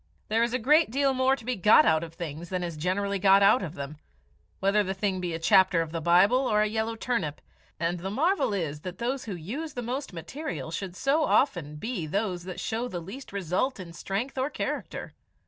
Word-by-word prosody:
There 225 +2 +2
is 235 0 +2
a 255 - +1
great 300 +6 +4
deal 275 +3 +2
more 260 +1 +3
to 235 - -13
be 250 0 -1
got 210 +3 +6
out 160 0 +3
of 165 -1 -9
things 165 0 -6
than 185 -1 -2
is 170 -2 -4
generally 195 +5 -1
got 195 +1 +6
out 210 +5 +5
of 175 -3 -5
them, 140 0 -6 0.6
whether 200 +2 +3
the 190 0 -3
thing 190 -2 -1
be 175 -2 -2
a - - -2
chapter 180 +2 +4
of 165 -1 -2
the 165 0 -3
Bible 180 +9 +5
or 210 - +2
a 210 - +4
yellow 220 +1 -2
turnip, 220 -11 -2 0.4
and 170 +1 -1
the 190 +3 -4
marvel 315 - +1
is 160 -7 -2
that 180 +3 -7
those 250 +3 -2
who 205 -4 -4
use 265 - -5
the 245 - -3
most 260 +5 -4
material 170 - -6
should 185 +1 -5
so 280 +9 +2
often 175 - +1
be 190 -1 -4
those 185 0 -2
that 185 -1 -6
show 230 +3 -2
the 180 -7 -5
least 200 +11 -9
result 200 - -1
in 170 -2 -8
strength 215 +10 -3
or 265 +2 0
character. - - -4
195 Hz, 220 wpm, -27 LUFS, 170-245 Hz, 0.6 s, got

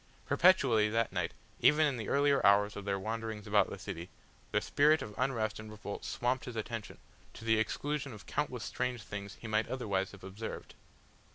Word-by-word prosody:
Perpetually 135 -12 +5
that 115 +1 +1
night, - - -1 0.3
even 155 +1 +5
in 140 -3 +1
the 110 -3 -4
earlier 140 0 +3
hours 105 +1 +5
of 100 - -6
their 100 -1 0
wanderings 110 0 -4
about - - +3
the - - -6
city, 85 +2 -6 0.4
the - - +3
spirit 150 +2 +3
of 105 - -8
unrest 115 -5 0
and 110 0 -8
revolt 105 -1 -7
swamped 125 +1 -1
his 125 - -6
attention, 110 -1 -5 0.4
to 115 - -10
the 110 -1 +4
exclusion 140 +5 -2
of 105 -3 -11
countless - - -2
strange 125 -3 -2
things 100 -1 -6
he 115 - -9
might 110 0 +1
otherwise 100 -7 -1
have 100 - -13
observed. 100 +4 -7
110 Hz, 185 wpm, -33 LUFS, 105-130 Hz, 0.4 s, Perpetually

